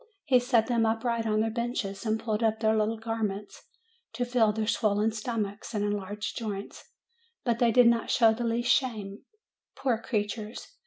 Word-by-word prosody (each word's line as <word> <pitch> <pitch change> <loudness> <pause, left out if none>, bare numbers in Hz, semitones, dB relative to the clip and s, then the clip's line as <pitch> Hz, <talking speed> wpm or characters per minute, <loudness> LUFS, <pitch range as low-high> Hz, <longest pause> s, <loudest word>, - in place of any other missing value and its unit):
He 260 -4 +5
set 240 -2 +2
them 235 -2 +1
upright 225 +1 0
on 215 0 +2
their 225 0 0
benches 225 -4 -3
and 220 0 +1
pulled 220 -1 -2
up 220 -1 +1
their 220 -1 +2
little 220 +1 +1
garments, 215 -3 -4 0.5
to 245 - -1
feel 240 -3 +3
their 215 +1 -2
swollen 215 0 +1
stom 220 0 -2
achs 205 +3 -8
and 205 0 0
enlarged 205 0 -3
joints; 205 -4 -6 0.5
but 235 -2 0
they 235 -2 +4
did 245 +2 +6
not 235 -1 +3
show 225 -2 +5
the 240 +2 -4
least 235 +2 +1
shame, 215 -5 -2 0.5
poor 250 -5 0
creatures 215 - -4
225 Hz, 175 wpm, -28 LUFS, 210-235 Hz, 0.5 s, did